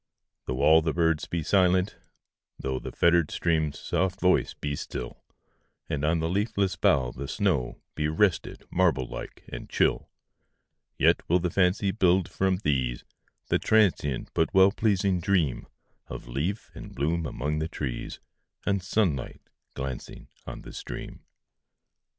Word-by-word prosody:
Though 65 +1 -2
all 80 +1 +7
the 80 -1 -1
birds 80 -2 +1
be 85 -2 -2
silent,—thoughThe 90 -7 -1
fettered 85 -2 +4
stream's 80 -3 0
soft 95 +2 -1
voice 90 0 +2
be 70 -1 -3
still, - - -6 0.7
And 70 - -2
on 80 +2 +2
the 80 0 -1
leafless 100 +1 0
bough 65 -2 +2
the 70 +3 -6
snowBe 75 - -1
rested, 95 +2 +1
marble 85 -8 +2
like - - -8
and - - -8
chill,—Yet - - -2
will 90 - +5
the 90 -1 -1
fancy 95 +2 +2
build, 95 -3 +3
from 95 -1 0
these, 65 -4 0 0.5
The - - +2
transient 90 - +2
but 80 - +1
well 95 +1 +7
pleasing 100 -4 +1
dreamOf 85 - +1 0.6
leaf 75 - -3
and - - -10
bloom 80 +3 0
among 75 +2 -2
the 80 - -1
trees, 70 -6 -5 0.5
And 100 -1 +1
sunlight 90 - -1 0.3
glancing 65 -1 -6 0.2
on - - -7
the - - -10
stream. - - -7
85 Hz, 130 wpm, -27 LUFS, 70-95 Hz, 0.7 s, all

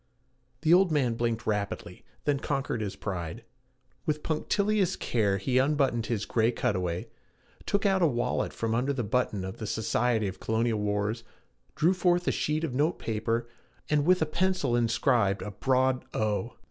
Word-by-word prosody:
The 160 +1 +4
old 185 -1 +5
man 135 -6 +2
blinked 115 0 -1
rapidly, 105 -2 -3 0.2
then 145 -2 +2
conquered 135 -5 -2
his 100 -3 -3
pride. 85 -6 -5 0.6
With 150 0 -1
punctilious 195 +4 +1
care 105 -5 0
he 125 +7 +1
unbuttoned 135 -4 +1
his 110 -3 -1
gray 115 0 +2
cutaway, 90 -6 -1 0.6
took 200 +1 +1
out 190 -1 +3
a 170 - +5
wallet 120 -4 -1
from 115 -1 -2
under 130 +5 +1
the 130 -3 -2
button 105 -3 0
of 95 - -6
the 110 - -5
Society 110 0 +1
of 95 - -6
Colonial 110 0 0
Wars, 105 +2 -1 0.5
drew 170 +4 +3
forth 175 -1 +1
a - - +4
sheet 155 +1 -1
of 155 -6 -2
note 150 +6 +1
paper, 115 +1 -2 0.4
and 150 -1 +3
with 180 +1 +4
a - - +1
pencil 180 -5 0
inscribed 115 -4 +2
a 105 - -5
broad 130 +4 +1
O. 110 +1 -1
120 Hz, 165 wpm, -28 LUFS, 110-150 Hz, 0.6 s, old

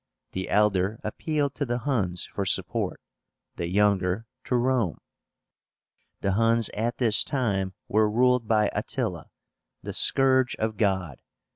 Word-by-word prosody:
The 95 0 -4
elder 105 0 +2
appealed 145 +5 -2
to 145 - -3
the 120 -3 -1
Huns 110 -9 -1
for 100 - -4
support, 95 - 0 0.6
the 85 - -2
younger 100 +1 +1 0.2
to 125 - 0
Rome. 120 - +1 1.2
The 100 - 0
Huns 115 +2 +2
at 115 +3 -2
this 115 -4 +3
time 100 -9 -1
were 110 0 +2
ruled 125 +1 +2
by 105 -2 +2
ATTILA, - - -3 0.5
"the - - -5
Scourge 130 -1 +3
of 110 -1 -3
God." 95 - -1
110 Hz, 130 wpm, -26 LUFS, 95-125 Hz, 1.2 s, this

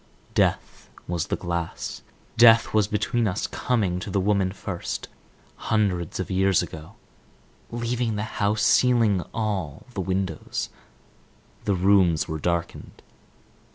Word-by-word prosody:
Death - - 0 0.2
was 85 -2 -2
the - - 0
glass; 85 -1 -4 0.3
death 115 -1 +6
was 105 -2 +3
between 110 +2 0
us; 100 +2 -1
coming 100 -8 0
to 95 - -6
the 100 - 0
woman 95 -1 +1
first, 95 -2 -5 0.6
hundreds 95 -7 0
of 95 - -3
years 95 -1 +3
ago, 80 0 -9 0.7
leaving 120 -1 -1
the 105 - -2 0.2
house, 105 +1 +2
sealing 115 -7 +4
all 95 -10 -3
the 95 - -2
windows; 95 +1 -2 1.0
the 100 - +2
rooms 90 -3 +3
were 80 -2 -4
darkened. 85 +1 -3
95 Hz, 120 wpm, -25 LUFS, 90-110 Hz, 1.0 s, death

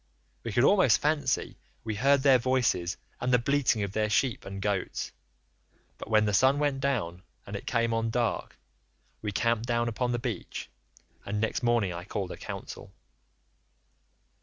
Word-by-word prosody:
We 115 - -4
could 120 +4 +3
almost 190 +4 +5
fancy 145 -3 0 0.2
we 110 - -3
heard 135 +5 +3
their 135 -3 +6
voices 120 -8 +1 0.2
and 125 - -1
the 125 - +6
bleating 125 -3 +1
of 100 - -3
their 105 +1 0
sheep 115 +2 +1
and 100 0 -6
goats, 100 -2 -2 0.9
but - - -8
when 110 -1 +4
the 105 - 0
sun 130 +8 +4
went 145 -2 0
down 110 -11 -1 0.2
and 100 - -7
it 100 - -7
came 115 -1 +1
on 115 0 0
dark, 120 0 -1 0.6
we 105 - -3
camped 115 +4 0
down 120 -1 +1
upon 120 +2 -1
the 120 - 0
beach, 115 -5 -5 0.5
and 105 +1 -3
next 110 +1 -1
morning 120 -6 +2
I 85 +1 -6
called 95 -2 -4
a - - -7
council. - - -8
115 Hz, 165 wpm, -28 LUFS, 105-130 Hz, 0.9 s, their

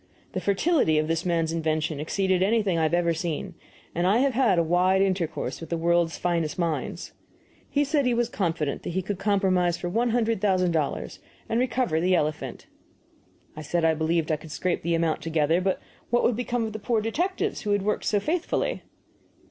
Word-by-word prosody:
The - - -3
fertility 200 - +2
of 155 0 +1
this 165 +2 -1
man's 165 -2 +1
invention 155 -2 -1
exceeded 185 +4 0
anything 205 -2 +2
I 165 - +1
have 160 +1 +1
ever 170 -1 +2
seen, 165 -1 -3 0.4
and 175 +2 +1
I 200 +4 +4
have 270 +1 +2
had 235 -7 +3
a 170 - +4
wide 180 +3 +3
intercourse 185 -5 -2
with 165 - -8
the 170 - -1
world's 170 0 +1
finest 170 -3 -1
minds. 170 -3 -3 0.6
He 290 - +2
said 285 -2 +1
he 245 - +2
was 240 0 +1
confident 165 - -2
he 185 +2 -2
could 190 0 -4
compromise 190 -4 +2
for 175 - -4
one 235 +6 +1
hundred 230 -3 +1
thousand 185 -3 +2
dollars 155 -4 -2 0.3
and 225 - 0
recover 245 -9 +1
the 185 +1 +3
elephant. 150 -2 -2 0.9
I 155 - -7
said 165 +2 0
I 160 - +4
believed 160 +1 0
I 155 - +1
could 160 +1 -12
scrape 180 +4 -1
the 170 +1 0
amount 165 -1 0
together, 160 +1 +1
but 190 0 0 0.3
what 240 +1 +2
would 240 - +3
become 245 0 -1
of 220 - -5
the 220 - -5
poor 225 +1 0
detectives 360 - -1
who 210 - -4
had 205 -1 +2
worked 210 +1 -1
so 205 - +2
faithfully? 325 - -1
180 Hz, 195 wpm, -26 LUFS, 165-220 Hz, 0.9 s, I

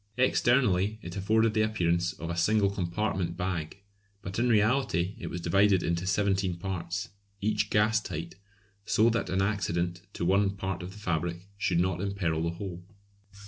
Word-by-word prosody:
Externally 115 -5 +3
it 85 - -7
afforded 110 +3 +2
the 110 - +2
appearance 90 -5 +1
of 85 -2 -6
a - - -3
single 100 +3 +3
compartment 90 -2 -2
bag, 90 0 -3 0.4
but 95 +3 -4
in 120 +1 +2
reality 105 -5 +2
it - - -5
was 90 - -4
divided 95 +3 +3
into 85 +2 -1
seventeen 95 -2 +1
parts, 95 +2 -4 0.3
each 110 +1 0
gas 110 +1 +3
tight, 85 -3 -5 0.5
so 110 +2 +3
that 115 -5 -1
an 95 +2 +1
accident 85 -4 -1
to 85 - -3
one 100 +2 +2
part 95 -2 -3
of 90 +1 -7
the - - -13
fabric 85 -2 -2
should 95 -4 +1
not 90 0 0
imperil 95 -5 -1
the 85 - 0
whole. 90 -2 -6
95 Hz, 165 wpm, -29 LUFS, 85-105 Hz, 0.5 s, Externally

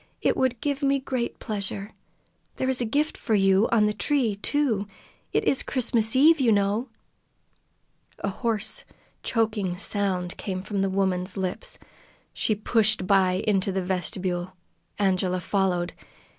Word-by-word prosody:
"It - - +1
would 255 -3 0
give 285 -1 -1
me 275 0 +3
great 260 -3 -3
pleasure. 200 -1 -3 0.6
There 260 - -2
is 260 -1 0
a - - +1
gift 290 +7 0
for 220 - 0
you 195 +1 +4
on 220 -2 +4
the 210 - +1
tree, 260 -4 +1
too. 220 -1 0 0.4
It - - +1
is 270 - +3
Christmas 230 -3 +1
Eve, 310 +4 +6
you 245 -4 +3
know!" 205 +4 +1 1.3
A - - -2
hoarse, 215 0 -1 0.4
choking 215 -6 0
sound 185 -3 -1
came 185 -2 -4
from 205 0 -3
the 195 - +1
woman's 190 0 -1
lips. 190 - -4 0.6
She 215 - 0
pushed 215 -1 +1
by 185 -1 +3
into 195 -2 +1
the 190 0 -1
vestibule. 180 0 -2 0.4
Angela 185 -2 +1
followed. 180 -2 0
205 Hz, 145 wpm, -25 LUFS, 190-235 Hz, 1.3 s, Eve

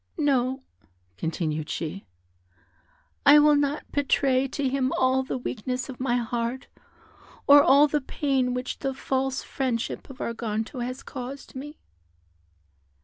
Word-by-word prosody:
"No," 265 -3 +1 0.5
continued 155 - -3
she, 170 +4 -4 1.2
"I 290 +1 +8
will 300 0 +6
not 285 +1 -1
betray 270 -2 +2
to 275 +1 -2
him 260 0 0
all 260 0 +3
the 260 - -3
weakness 250 +2 -4
of 260 - -8
my 250 -2 +1
heart, 235 +1 -2 0.8
or 285 0 +9
all 285 +1 +6
the 295 0 0
pain 260 -2 0
which 250 +1 -4
the 270 -1 -2
false 265 0 -1
friendship 250 -2 -3
of 270 - -10
Arganto 230 +1 -3
has 255 +2 -5
caused 265 +1 -8
me." 295 +3 -8
260 Hz, 130 wpm, -26 LUFS, 245-275 Hz, 1.2 s, or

